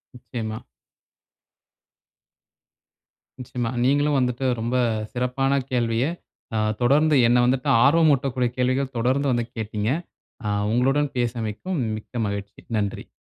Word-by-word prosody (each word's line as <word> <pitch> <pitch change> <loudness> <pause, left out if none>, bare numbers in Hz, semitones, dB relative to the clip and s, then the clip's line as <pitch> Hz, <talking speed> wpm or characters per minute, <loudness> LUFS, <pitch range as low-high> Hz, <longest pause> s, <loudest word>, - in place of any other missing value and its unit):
நிச்சயமா. 110 -3 -5 2.8
நிச்சயமா. 125 -1 -3
நீங்களும் 145 +2 +3
வந்துட்டு 125 +1 -1 0.2
ரொம்ப 120 +3 -1 0.4
சிறப்பான 135 +2 +1
கேள்விய 120 -1 +1 0.5
அ - - +1 0.2
தொடர்ந்து 150 +5 +4
என்ன 120 +1 +4
வந்துட்டு 125 +1 +1
ஆர்வமூட்டக்கூடிய 140 -4 +3
கேள்விகள் 130 +2 0
தொடர்ந்து 130 +4 +1
வந்து 120 -1 0
கேட்டீங்க. 105 -1 -2 0.6
ஆ - - -1 0.2
உங்களுடன் 135 +4 +1
பேசியமைக்கும் 120 - -2 0.2
மிக்க 115 +2 -5
மகிழ்ச்சி. 100 0 -5 0.2
நன்றி. 100 -1 -3
125 Hz, 100 wpm, -24 LUFS, 115-135 Hz, 2.8 s, தொடர்ந்து